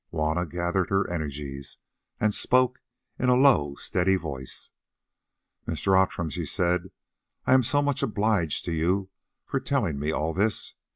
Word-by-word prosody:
Juanna 80 Hz, +2 st, -1 dB
gathered 90 Hz, +3 st, -1 dB
her 95 Hz, 0 st, +1 dB
energies, 70 Hz, -4 st, -5 dB, 0.4 s
and 110 Hz, -1 st, +2 dB
spoke 125 Hz, +2 st, +2 dB, 0.4 s
in 125 Hz, -, +2 dB
a 125 Hz, -, +6 dB
low 125 Hz, -, +4 dB
steady 95 Hz, +5 st, +1 dB
voice. 70 Hz, -8 st, -4 dB, 1.0 s
"Mr. 85 Hz, +4 st, +1 dB
Outram," 95 Hz, -3 st, +1 dB
she -, -, -3 dB
said, 90 Hz, 0 st, 0 dB, 0.6 s
"I -, -, +4 dB
am 130 Hz, -, +6 dB
so 145 Hz, +4 st, +2 dB
much 145 Hz, -2 st, 0 dB
obliged 105 Hz, -, 0 dB
to 85 Hz, -, -2 dB
you 90 Hz, +4 st, 0 dB, 0.3 s
for 135 Hz, -, -1 dB
telling 130 Hz, -, -1 dB
me 75 Hz, +2 st, -1 dB
all 80 Hz, +1 st, -1 dB
this. 105 Hz, +4 st, 0 dB
90 Hz, 150 wpm, -26 LUFS, 80-110 Hz, 1.0 s, a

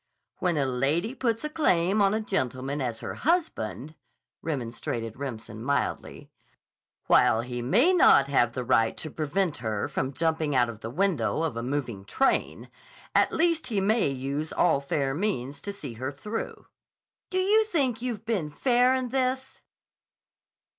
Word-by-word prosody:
"When 175 Hz, -3 st, +1 dB
a 140 Hz, -, +2 dB
lady 140 Hz, -, 0 dB
puts 235 Hz, -3 st, -1 dB
a 300 Hz, -, -2 dB
claim 195 Hz, -, +2 dB
on 200 Hz, +1 st, +3 dB
a -, -, 0 dB
gentleman 135 Hz, -, -2 dB
as 120 Hz, -3 st, -3 dB
her -, -, -5 dB
husband," 155 Hz, -, -1 dB, 0.5 s
remonstrated 115 Hz, -5 st, -4 dB
Remsen 115 Hz, -5 st, -7 dB
mildly, 140 Hz, 0 st, -2 dB, 0.7 s
"while 110 Hz, -, +4 dB
he 120 Hz, 0 st, -5 dB
may 235 Hz, -, +4 dB
not 140 Hz, -, +6 dB
have 120 Hz, -4 st, +2 dB
the 125 Hz, -, -3 dB
right 115 Hz, -2 st, +2 dB
to 155 Hz, -, -6 dB
prevent 160 Hz, +2 st, -1 dB
her 110 Hz, -3 st, -2 dB
from 130 Hz, +1 st, -3 dB
jumping 160 Hz, -2 st, 0 dB
out 120 Hz, -2 st, +3 dB
of 110 Hz, -2 st, -8 dB
the 115 Hz, -, -6 dB
window 170 Hz, +2 st, 0 dB
of 160 Hz, -8 st, -2 dB
a 115 Hz, -, -3 dB
moving 125 Hz, -6 st, -3 dB
train, 265 Hz, -, 0 dB, 0.4 s
at -, -, +4 dB
least 330 Hz, -1 st, +1 dB
he 215 Hz, -5 st, 0 dB
may 215 Hz, +4 st, +2 dB
use 140 Hz, +3 st, -3 dB
all 155 Hz, -5 st, +2 dB
fair 140 Hz, -1 st, -1 dB
means 145 Hz, -, -2 dB
to 200 Hz, -, -4 dB
see 200 Hz, -11 st, -7 dB
her 130 Hz, +5 st, -4 dB
through." 210 Hz, +11 st, -6 dB, 0.6 s
"Do 370 Hz, -, -2 dB
you 410 Hz, +4 st, +4 dB
think 275 Hz, -, 0 dB
you've 235 Hz, -4 st, -4 dB
been 200 Hz, -9 st, -1 dB
fair 250 Hz, -, +3 dB
in 255 Hz, -1 st, -2 dB
this?" 260 Hz, +1 st, -2 dB
155 Hz, 160 wpm, -27 LUFS, -, 0.7 s, not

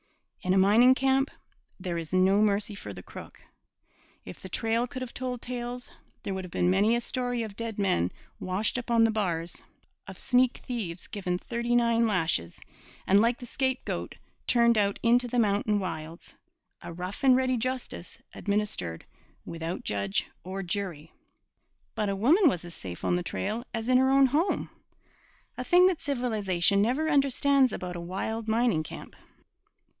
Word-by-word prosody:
In 185 Hz, +1 st, +1 dB
a -, -, +4 dB
mining 220 Hz, +7 st, +6 dB
camp 270 Hz, +1 st, +2 dB, 0.5 s
there 180 Hz, -2 st, -3 dB
is 165 Hz, -2 st, -7 dB
no 190 Hz, +2 st, +4 dB
mercy 210 Hz, 0 st, +1 dB
for 200 Hz, -, -8 dB
the -, -, -10 dB
crook. -, -, -11 dB, 0.9 s
If -, -, -9 dB
the -, -, -9 dB
trail 230 Hz, +1 st, 0 dB
could 255 Hz, +1 st, -6 dB
have 250 Hz, -, -8 dB
told 250 Hz, -1 st, -4 dB
tales, 245 Hz, 0 st, -5 dB, 0.3 s
there 195 Hz, -, -3 dB
would 190 Hz, 0 st, -4 dB
have 180 Hz, -, -9 dB
been 175 Hz, +1 st, +2 dB
many 205 Hz, +5 st, +3 dB
a 240 Hz, -, 0 dB
story 245 Hz, -1 st, -2 dB
of 210 Hz, -3 st, -7 dB
dead 230 Hz, -1 st, -5 dB
men 90 Hz, -, +1 dB, 0.3 s
washed 195 Hz, +6 st, -1 dB
up 245 Hz, -, -9 dB
on 230 Hz, -1 st, +4 dB
the 225 Hz, -, +4 dB
bars, 175 Hz, -6 st, -2 dB, 0.5 s
of -, -, -9 dB
sneak 250 Hz, 0 st, +2 dB
thieves 200 Hz, -9 st, -4 dB
given 180 Hz, -3 st, -3 dB
thirty 235 Hz, +4 st, -2 dB
nine 235 Hz, -1 st, +3 dB
lashes 165 Hz, -, 0 dB, 0.5 s
and 200 Hz, +2 st, +5 dB
like 235 Hz, +2 st, +2 dB
the 245 Hz, -, -9 dB
scapegoat 260 Hz, +1 st, -2 dB, 0.3 s
turned 235 Hz, -1 st, +4 dB
out 200 Hz, -1 st, +1 dB
into 245 Hz, +1 st, +4 dB
the 245 Hz, -, -3 dB
mountain 210 Hz, -1 st, +2 dB
wilds 165 Hz, -3 st, -6 dB, 0.5 s
a -, -, -8 dB
rough 180 Hz, -, -6 dB
and 260 Hz, -2 st, +6 dB
ready 255 Hz, 0 st, +2 dB
justice 255 Hz, +2 st, -4 dB, 0.2 s
administered 200 Hz, -, -3 dB, 0.4 s
without 165 Hz, +1 st, -5 dB
judge 100 Hz, -1 st, -1 dB, 0.2 s
or 190 Hz, +2 st, -5 dB
jury. 175 Hz, -5 st, -4 dB, 0.8 s
But 210 Hz, -2 st, -1 dB
a 195 Hz, -, -1 dB
woman 305 Hz, -, +5 dB
was 175 Hz, -8 st, -3 dB
as 175 Hz, -, -9 dB
safe 90 Hz, -, -8 dB
on -, -, +2 dB
the -, -, -2 dB
trail 215 Hz, +6 st, -3 dB
as 225 Hz, 0 st, -4 dB
in 255 Hz, 0 st, +5 dB
her 265 Hz, 0 st, +3 dB
own 275 Hz, 0 st, +6 dB
home 300 Hz, +9 st, 0 dB, 0.8 s
a -, -, -4 dB
thing 360 Hz, 0 st, +5 dB
that 370 Hz, -3 st, +2 dB
civilization 210 Hz, -, +1 dB
never 260 Hz, +9 st, +1 dB
understands 275 Hz, -2 st, +3 dB
about 180 Hz, -1 st, -5 dB
a 175 Hz, -, -5 dB
wild 215 Hz, +6 st, -4 dB
mining 225 Hz, -6 st, +2 dB
camp. 155 Hz, -, -9 dB
220 Hz, 170 wpm, -28 LUFS, 185-250 Hz, 0.9 s, mining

